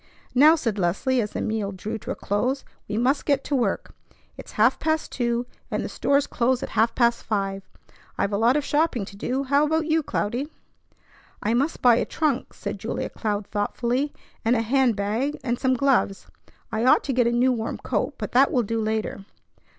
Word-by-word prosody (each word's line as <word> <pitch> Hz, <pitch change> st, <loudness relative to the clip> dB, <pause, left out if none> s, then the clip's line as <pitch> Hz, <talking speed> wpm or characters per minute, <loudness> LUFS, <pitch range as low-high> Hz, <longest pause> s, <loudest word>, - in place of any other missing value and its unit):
"Now," 300 Hz, +5 st, +7 dB
said 230 Hz, -9 st, -2 dB
Leslie 205 Hz, +9 st, +1 dB
as 210 Hz, -, -4 dB
the -, -, -3 dB
meal 215 Hz, -2 st, -2 dB
drew 210 Hz, +4 st, -5 dB
to -, -, -10 dB
a -, -, -1 dB
close, 250 Hz, +7 st, -1 dB, 0.2 s
"we 210 Hz, -, -3 dB
must 260 Hz, +5 st, +2 dB
get 280 Hz, -2 st, +1 dB
to 290 Hz, -, -1 dB
work. 235 Hz, -7 st, -1 dB, 0.4 s
It's -, -, -11 dB
half 225 Hz, +5 st, +3 dB
past 315 Hz, 0 st, -1 dB
two, 240 Hz, -1 st, -1 dB, 0.2 s
and -, -, -2 dB
the -, -, -4 dB
stores 280 Hz, 0 st, +1 dB
close 255 Hz, +2 st, 0 dB
at -, -, -4 dB
half 225 Hz, +2 st, +1 dB
past 235 Hz, -1 st, +2 dB
five. 195 Hz, -2 st, -2 dB, 0.6 s
I've 200 Hz, +1 st, 0 dB
a -, -, +2 dB
lot 240 Hz, +5 st, +4 dB
of 295 Hz, -, -1 dB
shopping 295 Hz, -8 st, +1 dB
to 200 Hz, -, -12 dB
do. 255 Hz, +6 st, -2 dB
How 280 Hz, +2 st, +3 dB
about 315 Hz, +1 st, +1 dB
you, 320 Hz, 0 st, +2 dB
Cloudy?" 260 Hz, +2 st, -2 dB, 0.9 s
"I 215 Hz, -, +1 dB
must 275 Hz, +7 st, 0 dB
buy 240 Hz, -2 st, +6 dB
a -, -, +1 dB
trunk," 295 Hz, -5 st, -1 dB
said -, -, -5 dB
Julia -, -, -3 dB
Cloud 210 Hz, -2 st, -2 dB
thoughtfully, 240 Hz, +7 st, -1 dB, 0.3 s
"and 230 Hz, +2 st, +3 dB
a 225 Hz, -, +1 dB
hand 255 Hz, 0 st, +2 dB
bag 220 Hz, +9 st, -1 dB
and 240 Hz, -2 st, -1 dB
some 260 Hz, -1 st, +2 dB
gloves. 250 Hz, -7 st, +1 dB, 0.5 s
I 220 Hz, -, -1 dB
ought 255 Hz, -, +5 dB
to 275 Hz, -, -2 dB
get 245 Hz, -1 st, +3 dB
a -, -, +2 dB
new 245 Hz, +2 st, +3 dB
warm 225 Hz, -2 st, -2 dB
coat, -, -, -2 dB
but -, -, -5 dB
that 265 Hz, +3 st, +4 dB
will 245 Hz, -, +2 dB
do 225 Hz, +1 st, -2 dB
later." 215 Hz, -2 st, -2 dB
240 Hz, 205 wpm, -24 LUFS, 215-275 Hz, 0.9 s, Now